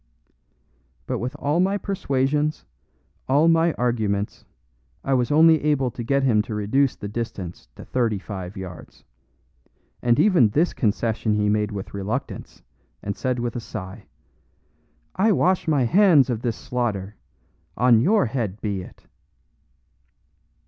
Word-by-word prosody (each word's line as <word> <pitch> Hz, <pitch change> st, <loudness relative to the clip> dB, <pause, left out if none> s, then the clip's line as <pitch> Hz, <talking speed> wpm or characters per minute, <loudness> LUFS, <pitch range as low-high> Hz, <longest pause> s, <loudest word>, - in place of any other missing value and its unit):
But -, -, -3 dB
with 125 Hz, +2 st, -4 dB
all 150 Hz, +4 st, 0 dB
my 195 Hz, +2 st, +2 dB
persuasions, 150 Hz, -6 st, -1 dB, 0.6 s
all 145 Hz, +5 st, +4 dB
my 165 Hz, 0 st, +3 dB
arguments, 110 Hz, -4 st, -2 dB, 0.6 s
I 135 Hz, -, 0 dB
was 125 Hz, -2 st, +1 dB
only 160 Hz, +1 st, +5 dB
able 140 Hz, -4 st, +1 dB
to 120 Hz, -, -7 dB
get 140 Hz, +3 st, +1 dB
him 115 Hz, -5 st, +3 dB
to 110 Hz, 0 st, -6 dB
reduce 125 Hz, +6 st, +1 dB
the 105 Hz, -, -7 dB
distance 100 Hz, -, -6 dB
to -, -, -11 dB
thirty 115 Hz, -5 st, 0 dB
five 95 Hz, -1 st, -7 dB
yards; 95 Hz, -2 st, -10 dB, 1.0 s
and 120 Hz, -1 st, +2 dB
even 180 Hz, -, +5 dB
this 160 Hz, +11 st, +1 dB
concession 110 Hz, -1 st, 0 dB
he 105 Hz, 0 st, +1 dB
made 105 Hz, 0 st, 0 dB
with 100 Hz, -2 st, -7 dB
reluctance, 105 Hz, +8 st, -5 dB, 0.4 s
and 100 Hz, 0 st, -3 dB
said 130 Hz, -1 st, -2 dB
with 120 Hz, -1 st, -3 dB
a -, -, -2 dB
sigh, 105 Hz, -1 st, -8 dB, 1.1 s
"I 215 Hz, +4 st, +3 dB
wash 185 Hz, -1 st, +1 dB
my 145 Hz, -5 st, +2 dB
hands 160 Hz, -, +5 dB
of 115 Hz, -2 st, -3 dB
this 120 Hz, -3 st, -1 dB
slaughter; 105 Hz, -5 st, -3 dB, 0.6 s
on 120 Hz, -1 st, +5 dB
your 205 Hz, -, +3 dB
head 110 Hz, -5 st, -3 dB
be 100 Hz, -4 st, -3 dB
it." -, -, -14 dB
120 Hz, 140 wpm, -23 LUFS, 105-145 Hz, 1.1 s, only